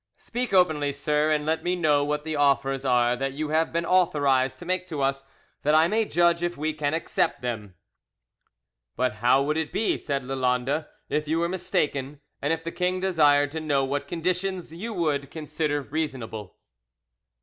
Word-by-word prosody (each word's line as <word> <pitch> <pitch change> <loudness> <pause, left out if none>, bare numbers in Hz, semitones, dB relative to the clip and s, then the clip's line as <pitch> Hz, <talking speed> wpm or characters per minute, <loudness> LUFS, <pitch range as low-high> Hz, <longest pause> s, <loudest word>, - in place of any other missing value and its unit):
Speak 245 -1 -4
openly, 155 -6 +3
sir, 150 +2 0
and 150 -1 +1
let 160 +1 0
me 180 +1 0
know 150 -5 +3
what 150 +1 -1
the 160 0 -3
offers 140 -2 +2
are 125 -2 +3
that 135 +2 -3
you 150 +2 -3
have 160 +1 +1
been 170 +1 -1
authorised 145 -8 +2
to 175 - -10
make 185 0 -1
to 155 -5 -5
us, 135 0 0 0.4
that 150 +1 +3
I 160 +1 +6
may 220 +4 +1
judge 170 -2 +2
if 175 0 -2
we 155 +2 -1
can 150 0 -1
accept 165 - -1
them." 105 -6 -4 1.2
"But 125 -4 0
how 125 +4 +4
would 150 +2 0
it 160 -1 -2
be," 220 - 0
said 140 -3 -2
Lalande, 130 +3 0 0.2
"if 150 0 -1
you 160 +2 +1
were 170 +1 +1
mistaken, 145 -6 -2 0.2
and 145 - 0
if 165 0 -1
the 165 - -4
king 180 +1 -1
desired 145 -6 +3
to 160 - -3
know 140 -3 +1
what 140 +2 -3
conditions 180 0 -2
you 210 +8 -5
would 150 -8 -1
consider 150 -1 -2
reasonable?" 130 - -5
150 Hz, 180 wpm, -26 LUFS, 140-170 Hz, 1.2 s, I